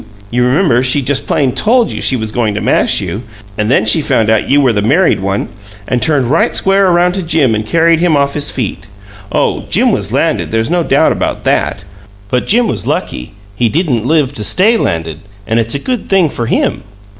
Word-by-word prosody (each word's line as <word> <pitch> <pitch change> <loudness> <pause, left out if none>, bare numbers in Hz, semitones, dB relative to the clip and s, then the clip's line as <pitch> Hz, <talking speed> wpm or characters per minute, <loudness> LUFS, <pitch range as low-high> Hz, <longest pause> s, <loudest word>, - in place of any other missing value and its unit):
You 125 +1 +1
remember, 125 -1 +2
she 130 +2 +1
just 140 +1 -1
plain 135 -3 +1
TOLD 230 - +1
you - - -5
she 130 - +2
was 110 -3 -4
going 110 -3 -1
to - - -2
mash - - +1
you, 95 +3 -4 0.3
and 105 +1 -2
then 125 - +2
she 110 +9 +3
found 110 -6 +1
out 110 - 0
you 140 +2 +4
were 130 -4 +2
the 105 - 0
married 150 - +2
one, 95 +1 -2 0.4
and 125 -1 -1
turned 145 -5 +1
right - - +1
square 195 0 +2
around 175 0 +2
to 190 - -3
Jim 160 -8 +1
and 110 0 -1
carried 165 +3 +2
him 170 -3 +2
off 140 0 0
his 145 -1 -1
feet. 100 -5 -5 0.4
Oh, - - 0
Jim - - +2
was - - -3
landed - - 0
there's 115 +6 -1
no 175 0 +1
doubt - - +2
about - - -3
THAT! - - -1 0.5
But 125 +1 -1
Jim 235 +2 +3
was 105 -6 -3
lucky; 60 - -4 0.2
he 115 +2 +1
didn't 140 - -1
live 145 0 +1
to 110 - -3
STAY 205 - +3
landed, 80 - -2 0.3
and 115 +1 0
it's 115 +3 -1
a - - +1
good 245 - -4
thing 185 -6 +2
for 115 - -4
him!" - - -1
130 Hz, 215 wpm, -13 LUFS, 110-165 Hz, 0.5 s, you